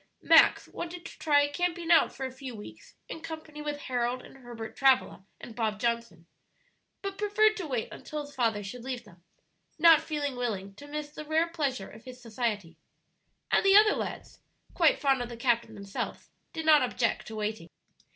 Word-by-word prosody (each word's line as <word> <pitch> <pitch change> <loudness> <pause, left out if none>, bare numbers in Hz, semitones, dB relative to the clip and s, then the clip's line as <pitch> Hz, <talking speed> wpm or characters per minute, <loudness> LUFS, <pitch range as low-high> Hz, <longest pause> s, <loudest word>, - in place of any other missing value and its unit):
Max - - +6
wanted 345 0 -7
to - - -10
try 290 -2 +4
camping 345 +2 -2
out 330 - +6
for 270 - -5
a 260 - -5
few 260 -2 -8
weeks 210 - -12
in 320 - -7
company 315 -2 -8
with 295 -1 -4
Harold 250 0 -2
and - - -14
Herbert 240 -3 -9
Travilla 260 -7 +2
and 230 - -10
Bob 220 -3 -1
Johnson, 235 -7 -2 0.8
but 395 0 -5
preferred 425 +1 +3
to 365 -5 -4
wait 250 -5 -2
until 305 0 -6
his 285 - -14
father 225 -4 0
should 230 +5 -8
leave 255 -2 -4
them, 180 -6 -19 0.5
not 325 -1 +7
feeling 290 -4 -3
willing 205 -6 -3
to 285 +9 -13
miss 295 0 -5
the 305 - -8
rare 320 +2 +1
pleasure 275 - -2
of 220 +3 -14
his 255 -1 -10
society. 215 -8 -3 0.7
And - - +4
the 390 0 +5
other 425 0 +6
lads, - - -6 0.3
quite 330 -4 +3
fond 270 -3 +2
of 240 - -4
the 235 - -8
captain 235 -1 0
themselves, 200 -1 -6 0.2
did 320 -1 -5
not 305 -2 +7
object 245 -2 -1
to 220 - -7
waiting. 210 -4 -4
260 Hz, 185 wpm, -29 LUFS, 230-315 Hz, 0.8 s, not